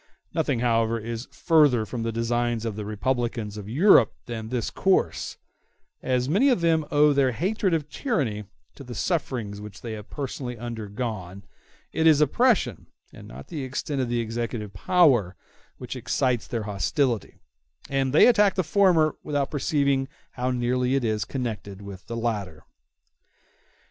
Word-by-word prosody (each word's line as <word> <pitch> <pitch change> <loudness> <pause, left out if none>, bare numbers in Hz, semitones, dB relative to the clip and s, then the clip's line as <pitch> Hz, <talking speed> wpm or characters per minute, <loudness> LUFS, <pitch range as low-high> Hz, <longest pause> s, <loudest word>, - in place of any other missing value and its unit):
Nothing, 115 - 0
however, 115 -1 +2
is 115 +2 -5
further 145 -9 +3
from 120 +1 -5
the 115 0 -1
designs 115 0 -1
of 110 -3 -3
the 105 -1 -5
republicans 115 0 -2
of 105 -1 -8
Europe 135 - +5
than 110 -2 -6
this 125 -2 -2
course: 190 -1 0 0.6
as 125 -1 0
many 205 - +3
of 245 -9 +2
them 160 -2 +2
owe 150 0 +4
their 135 -3 +2
hatred 190 - 0
of 150 -3 -2
tyranny 135 - -2 0.3
to - - -11
the 120 -2 -8
sufferings 120 - -2
which 105 -1 -10
they 115 - -6
have 105 -1 -9
personally 130 -3 -5
undergone, 105 -4 -5 0.5
it 160 0 +2
is 155 -2 +6
oppression, 150 - +2 0.3
and - - -12
not 65 +3 -11
the 150 -4 -4
extent 135 +2 -3
of 125 - -2
the 120 0 0
executive 115 -2 -4
power, 120 - +3 0.4
which - - -7
excites 125 -3 0
their 115 -3 -3
hostility, 105 - -1 0.5
and 135 -1 0
they 150 - +7
attack 210 -5 +4
the 185 - +1
former 175 -4 +3
without 145 -2 -2
perceiving 140 -2 +1 0.2
how 125 0 -2
nearly 125 +1 0
it 135 - 0
is 110 -2 0
connected 110 -7 -5
with 100 -2 -10
the 115 - -4
latter. 105 -8 -3
125 Hz, 155 wpm, -25 LUFS, 110-145 Hz, 0.6 s, they